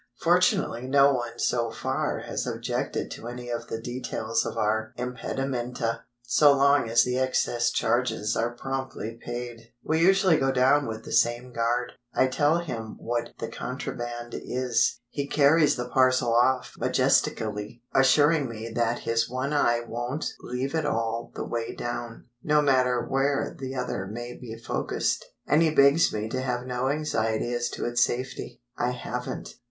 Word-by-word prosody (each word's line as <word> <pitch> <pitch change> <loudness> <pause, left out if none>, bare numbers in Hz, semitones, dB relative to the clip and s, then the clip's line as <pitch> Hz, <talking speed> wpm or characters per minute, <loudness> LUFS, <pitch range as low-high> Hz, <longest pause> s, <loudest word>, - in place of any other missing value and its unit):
Fortunately 120 +2 +2
no 140 +1 +5
one 120 -2 -3
so 120 -1 0
far 110 -1 -2
has - - -4
objected - - -3
to 115 - -7
any 120 0 -6
of 120 0 -4
the 115 - -4
details 115 -2 -2
of - - -5
our 110 +1 0
impedimenta, 125 -2 -3 0.2
so 145 +4 +5
long 140 -3 +4
as 115 +1 +5
the 125 +1 -1
excess 120 -2 +1
charges 115 -3 0
are 120 +1 -1
promptly 130 -3 -5
paid. 120 -1 -6
We 160 +1 +1
usually 190 -1 +5
go 135 -1 +2
down 135 +2 +3
with 110 0 -5
the - - -8
same 120 +2 +1
guard. 120 +2 0 0.2
I - - +4
tell 145 +5 +2
him 120 -10 -5
what 120 0 -3
the 115 - -4
contraband 120 0 -5
is. 125 -1 0
He 140 -1 -3
carries 145 +1 +4
the 125 -1 -4
parcel 130 -2 +3
off 125 +2 +2
majestically, 105 +3 0
assuring 145 +1 +4
me 115 0 -6
that 120 0 0
his 115 0 0
one 130 +4 -2
eye 120 -5 +3
won't 120 +6 -3
leave 125 +3 -4
it 160 -1 0
all 115 -1 -2
the - - -4
way 115 -1 -3
down, 120 -1 -5 0.2
no 150 +2 +3
matter 125 -3 +2
where 135 +1 0
the 135 0 -6
other 95 -6 -3
may 120 +4 -6
be 115 -2 -8
focused; 115 - -1 0.2
and 150 - +3
he 165 - +4
begs 145 +2 +5
me 105 0 -3
to 130 +2 -2
have 125 -1 -2
no 125 +1 -1
anxiety 120 -6 -1
as 120 0 -1
to - - -4
its 120 0 +3
safety. 125 - -4
I 120 - 0
haven't. 125 0 -5
125 Hz, 160 wpm, -26 LUFS, 115-135 Hz, 0.2 s, no